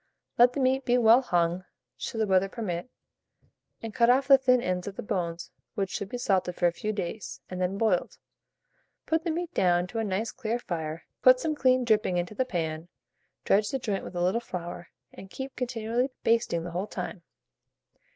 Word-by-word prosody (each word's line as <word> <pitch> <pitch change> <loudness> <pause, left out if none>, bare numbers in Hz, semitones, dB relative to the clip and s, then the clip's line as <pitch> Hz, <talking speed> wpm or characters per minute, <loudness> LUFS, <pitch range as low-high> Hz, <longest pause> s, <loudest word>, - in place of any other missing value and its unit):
Let 245 +1 +6
the 285 - -3
meat 265 0 +2
be 245 0 +2
well 235 +1 +6
hung 175 -5 0 0.3
(should 225 - -5
the - - +3
weather 190 -1 +2
permit), 200 -2 -4 0.9
and 225 -2 -5
cut 235 +2 +3
off 265 +2 +4
the 275 -1 +9
thin 255 -1 +4
ends 180 -4 -2
of 200 - -5
the - - -6
bones, 175 -5 -3 0.2
which 195 -2 -2
should 200 - -4
be 245 - -4
salted 190 -6 0
for 175 - 0
a 175 - +5
few 215 +5 -3
days, 200 0 -5
and 185 0 -4
then 185 +2 0
boiled. 205 -5 0 0.9
Put 320 0 0
the - - 0
meat 345 +1 -3
down 175 -1 +3
to 225 - -3
a - - 0
nice 210 +2 -2
clear 235 -2 -2
fire, 165 -7 -5 0.2
put 255 0 +7
some 315 +3 -1
clean 255 -3 +3
dripping 215 -5 +2
into 175 +3 -2
the 260 +4 0
pan, 160 -5 -3 0.6
dredge 205 +1 +3
the 270 - -1
joint 210 -6 -3
with - - -9
a 175 - 0
little 190 +6 +1
flour, 175 -5 -7 0.2
and 195 - -11
keep 265 +6 -7
continually 245 0 -1
basting 230 -7 +1
the 175 - -6
whole 180 +4 -3
time. 185 - -6
210 Hz, 200 wpm, -28 LUFS, 180-245 Hz, 0.9 s, the